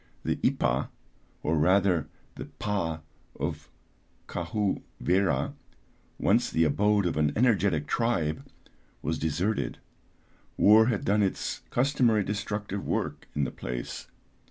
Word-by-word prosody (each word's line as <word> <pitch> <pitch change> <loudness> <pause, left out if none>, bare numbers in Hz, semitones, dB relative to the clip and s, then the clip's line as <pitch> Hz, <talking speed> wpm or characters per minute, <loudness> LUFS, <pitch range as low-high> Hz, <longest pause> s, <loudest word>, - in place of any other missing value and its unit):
The - - 0
Ipah, - - +1 0.6
or 80 - +1
rather 90 0 +3 0.3
the - - -7
Pah 85 -6 -3 0.4
of - - -4 0.6
Kahou 105 -3 -1 0.2
Wera, 90 -7 +1 0.6
once - - +2
the 80 - +2
abode 100 +6 +2
of 85 -3 -1
an 75 -1 +2
energetic 100 - +2
tribe, 100 -11 0 0.6
was 80 +1 -1
deserted, 85 +8 -1 0.8
war 110 +2 +7
had 115 -5 -1
done 105 +1 +3
its 95 -2 -1
customary 120 -5 +2
destructive 100 0 -3
work - - -2
in 75 - +1
the 65 - -1
place. - - -6
100 Hz, 115 wpm, -28 LUFS, 80-105 Hz, 0.8 s, war